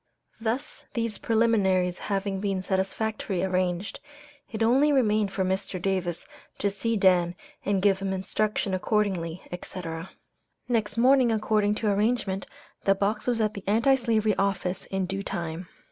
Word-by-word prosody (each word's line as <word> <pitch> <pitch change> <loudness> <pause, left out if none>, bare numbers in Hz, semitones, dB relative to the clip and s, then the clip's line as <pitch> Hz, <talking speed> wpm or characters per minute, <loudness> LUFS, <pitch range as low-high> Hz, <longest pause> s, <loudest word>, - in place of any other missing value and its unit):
Thus 240 +7 -3
these 230 -3 -2
preliminaries 195 -6 +2
having 195 -1 -1
been 195 -2 -1
satisfactorily 195 0 -1
arranged, 185 0 -1 0.5
it 225 -1 -1
only 270 +6 +4
remained 215 -7 +2
for 195 -1 -1
Mr. 190 0 -2
Davis 180 -2 -1 0.3
to 200 - 0
see 230 +3 -1
Dan 180 -3 +3 0.3
and 195 -1 0
give 195 -2 +4
him 195 0 -2
instructions 200 +1 -1
accordingly, 185 -3 0
etc. 175 -1 -6 0.6
Next 220 -3 0
morning, 255 0 +5
according 210 -1 +2
to 215 - -2
arrangement, 205 -2 0 0.4
the 195 - +4
box 210 +3 -1
was 240 -2 +1
at 215 -1 +1
the 200 - -7
Anti 230 +7 +4
Slavery 225 -5 +2
office 195 -1 -1
in 190 -1 -1
due 195 +2 -3
time. 170 -2 -4
200 Hz, 145 wpm, -27 LUFS, 190-220 Hz, 0.6 s, morning